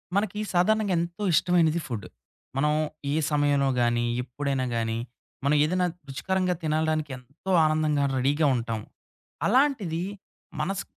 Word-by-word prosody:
మనకి 210 Hz, 0 st, 0 dB
సాధారణంగా 205 Hz, +3 st, +3 dB
ఎంతో 170 Hz, +4 st, -4 dB
ఇష్టమైనది 170 Hz, -2 st, +3 dB
ఫుడ్. 115 Hz, -6 st, -4 dB, 0.5 s
మనం 150 Hz, +2 st, +2 dB, 0.4 s
ఏ -, -, +1 dB, 0.2 s
సమయంలో 145 Hz, -2 st, +2 dB
గాని, 120 Hz, 0 st, +2 dB, 0.2 s
ఎప్పుడైనా 135 Hz, +1 st, -2 dB
గాని, 115 Hz, 0 st, -1 dB, 0.5 s
మనం 145 Hz, +2 st, +4 dB
ఏదైనా 180 Hz, +4 st, +1 dB, 0.2 s
రుచికరంగా 185 Hz, +6 st, 0 dB
తినగలడానికి 155 Hz, -1 st, 0 dB
ఎంతో 140 Hz, +9 st, -7 dB
ఆనందంగా 155 Hz, -2 st, +2 dB
రెడీ‌గా 145 Hz, +4 st, +2 dB
ఉంటాం. 115 Hz, -2 st, -2 dB, 0.7 s
అలాంటిది 220 Hz, -, +2 dB, 0.6 s
మనస్ 195 Hz, +5 st, -2 dB
155 Hz, 115 wpm, -26 LUFS, 135-180 Hz, 0.7 s, మనం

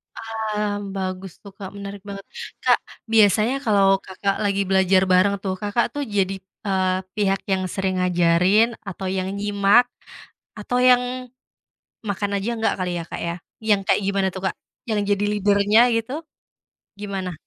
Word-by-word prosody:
Paham, 215 Hz, -2 st, -3 dB, 0.2 s
bagus 185 Hz, -1 st, -4 dB
tuh, 200 Hz, -, -12 dB
Kak, 195 Hz, -1 st, -8 dB
menarik 200 Hz, 0 st, -7 dB
banget. 195 Hz, -1 st, -7 dB, 0.4 s
Kak, -, -, +5 dB, 0.3 s
biasanya 220 Hz, +2 st, +4 dB
kalau 195 Hz, -3 st, +4 dB
Kakak 195 Hz, +1 st, -2 dB
lagi 200 Hz, -1 st, +1 dB
belajar 190 Hz, 0 st, +4 dB
bareng 185 Hz, +2 st, +4 dB
tuh, 190 Hz, -2 st, -1 dB
Kakak 230 Hz, +3 st, 0 dB
tuh 290 Hz, -, -2 dB
jadi, 195 Hz, 0 st, +1 dB, 0.3 s
eee, 185 Hz, -2 st, +1 dB, 0.2 s
pihak 195 Hz, -2 st, +1 dB
yang 190 Hz, -1 st, +1 dB
sering 190 Hz, 0 st, -1 dB
ngajarin 180 Hz, +5 st, +3 dB
atau 195 Hz, -1 st, -6 dB
yang 190 Hz, 0 st, -2 dB
nyimak 205 Hz, +3 st, +3 dB, 0.7 s
atau 245 Hz, +4 st, -2 dB
yang 250 Hz, -1 st, +6 dB, 1.1 s
makan 200 Hz, 0 st, -2 dB
aja 200 Hz, +4 st, -2 dB
nggak 220 Hz, -, +1 dB
kali 180 Hz, -1 st, -1 dB
ya, -, -, -4 dB
Kak, -, -, -6 dB
ya? 170 Hz, 0 st, -2 dB, 0.3 s
Yang 210 Hz, -2 st, +3 dB
kayak -, -, +4 dB
gimana 200 Hz, -1 st, +1 dB
tuh, 190 Hz, -, -6 dB
Kak? -, -, -8 dB, 0.3 s
Yang 215 Hz, -2 st, 0 dB, 0.2 s
jadi 205 Hz, +1 st, -1 dB
leader-nya 205 Hz, +1 st, +4 dB
gitu? 230 Hz, +3 st, -1 dB, 0.8 s
Gimana? 195 Hz, -3 st, -4 dB
200 Hz, 150 wpm, -22 LUFS, 190-210 Hz, 1.1 s, yang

